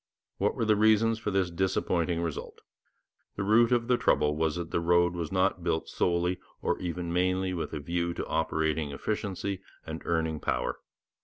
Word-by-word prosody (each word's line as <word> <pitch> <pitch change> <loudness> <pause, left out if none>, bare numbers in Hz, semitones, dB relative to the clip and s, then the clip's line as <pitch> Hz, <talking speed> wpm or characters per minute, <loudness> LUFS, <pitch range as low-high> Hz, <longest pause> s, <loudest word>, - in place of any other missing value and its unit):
What - - +1
were - - 0
the 110 -1 +4
reasons 110 +1 +4
for 110 - -2
this 95 -3 +1
disappointing 85 -1 0
result? 80 -4 -5 0.7
The - - -2
root 115 +4 +4
of 120 -1 +2
the 125 -1 +3
trouble 75 0 +2
was 80 0 0
that 85 -1 -5
the - - +1
road 85 +1 +3
was 85 -3 -4
not 95 -2 +1
built 80 -2 0
solely 90 +1 0 0.2
or - - -1
even 85 -1 -3
mainly 90 +1 +1
with 85 - -3
a 75 - -4
view 85 +3 -2
to - - -3
operating 80 -1 0
efficiency 100 +3 -3 0.2
and 80 0 -6
earning 80 -2 0
power. - - -1
90 Hz, 175 wpm, -29 LUFS, 80-95 Hz, 0.7 s, the